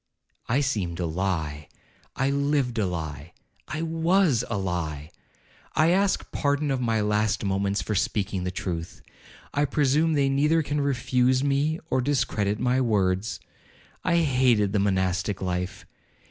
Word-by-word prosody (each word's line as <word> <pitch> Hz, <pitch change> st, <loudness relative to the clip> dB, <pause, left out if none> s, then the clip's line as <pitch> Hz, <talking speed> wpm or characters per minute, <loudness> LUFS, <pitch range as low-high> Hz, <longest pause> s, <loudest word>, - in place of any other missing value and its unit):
'I 130 Hz, +5 st, +2 dB
seemed 100 Hz, -12 st, -2 dB
a 90 Hz, -, 0 dB
lie—I 80 Hz, -, -4 dB
lived 140 Hz, -4 st, 0 dB
a 100 Hz, -, +1 dB
lie—I 85 Hz, -, -7 dB
was 165 Hz, -, +2 dB
a 110 Hz, -, -1 dB
lie—I 90 Hz, -, -3 dB
ask 195 Hz, +2 st, +1 dB
pardon 145 Hz, 0 st, 0 dB
of 130 Hz, -1 st, 0 dB
my 115 Hz, -3 st, +1 dB
last 105 Hz, 0 st, 0 dB
moments 100 Hz, 0 st, 0 dB
for 110 Hz, -, -2 dB
speaking 95 Hz, -1 st, -1 dB
the 90 Hz, -, -1 dB
truth—I 90 Hz, -, -5 dB
presume 150 Hz, +3 st, +2 dB
they 140 Hz, -2 st, +2 dB
neither 150 Hz, +4 st, +2 dB
can 145 Hz, +1 st, -1 dB
refuse 130 Hz, -1 st, +1 dB
me, 145 Hz, +3 st, +1 dB
or 130 Hz, -, +2 dB
discredit 125 Hz, -6 st, 0 dB
my 125 Hz, +1 st, +2 dB
words—I 105 Hz, -, -2 dB
hated 125 Hz, -8 st, +2 dB
the 105 Hz, -, +2 dB
monastic 95 Hz, 0 st, 0 dB
life. 90 Hz, -1 st, -3 dB
115 Hz, 125 wpm, -26 LUFS, 95-140 Hz, -, I